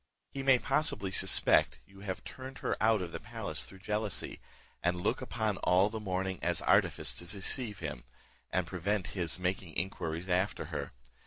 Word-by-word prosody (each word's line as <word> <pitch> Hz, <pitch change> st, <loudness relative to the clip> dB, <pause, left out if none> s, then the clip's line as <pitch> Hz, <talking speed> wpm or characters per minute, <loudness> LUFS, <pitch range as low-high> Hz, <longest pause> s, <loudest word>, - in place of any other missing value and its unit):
He 135 Hz, -, -4 dB
may, 135 Hz, -1 st, +6 dB
possibly, 135 Hz, -, +1 dB
suspect -, -, +4 dB
you 95 Hz, 0 st, -17 dB
have 95 Hz, -2 st, -5 dB
turned 130 Hz, +1 st, -8 dB
her -, -, +2 dB
out 110 Hz, -3 st, +4 dB
of 85 Hz, -, -6 dB
the -, -, -5 dB
palace -, -, -4 dB
through 95 Hz, -1 st, -13 dB
jealousy, 105 Hz, -2 st, -1 dB, 0.4 s
and 90 Hz, 0 st, +1 dB
look 120 Hz, -, 0 dB
upon 110 Hz, -5 st, -1 dB
all 95 Hz, +3 st, +4 dB
the 110 Hz, 0 st, -4 dB
mourning 95 Hz, -2 st, -2 dB
as 85 Hz, -1 st, +1 dB
an -, -, -3 dB
artifice -, -, +4 dB
to -, -, -7 dB
deceive 105 Hz, +3 st, 0 dB
him, 75 Hz, -3 st, -4 dB, 0.5 s
and 90 Hz, 0 st, 0 dB
prevent 95 Hz, +3 st, -1 dB
his 85 Hz, -5 st, 0 dB
making 90 Hz, -2 st, -2 dB
inquiries 85 Hz, -2 st, -2 dB
after 95 Hz, +2 st, 0 dB
her. -, -, -3 dB
95 Hz, 175 wpm, -32 LUFS, 90-110 Hz, 0.5 s, may